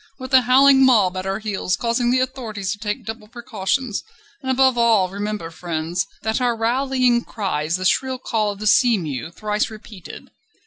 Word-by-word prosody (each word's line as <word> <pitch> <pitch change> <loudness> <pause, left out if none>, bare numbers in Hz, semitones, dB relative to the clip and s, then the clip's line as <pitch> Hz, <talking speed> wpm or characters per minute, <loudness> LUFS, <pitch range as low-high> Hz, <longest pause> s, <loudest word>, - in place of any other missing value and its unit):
with 260 0 -9
a 260 - +7
howling 265 +2 +5
mob 210 -8 +4
at 185 +1 -4
our 195 0 -1
heels 205 -4 -2
causing 240 +1 0
the 255 +1 +3
authorities 230 -7 -3
to 205 - -5
take 215 +2 -4
double 220 -1 -7
precautions. 235 0 -3 0.4
And 260 - -5
above 260 0 +3
all 225 -6 +3
remember, 205 -3 -5
friends, 165 +1 -3 0.2
that 220 +3 -1
our 245 -1 +1
rallying 250 +1 +1
cry 190 -8 -3
is 160 +2 0
the 185 0 -4
shrill 260 +6 +1
call 220 -4 -1
of 200 - -9
the 215 - -7
sea 230 +2 +4
mew 155 -4 -5
thrice 210 +4 -2
repeated. 215 -4 -12
220 Hz, 185 wpm, -21 LUFS, 195-250 Hz, 0.4 s, a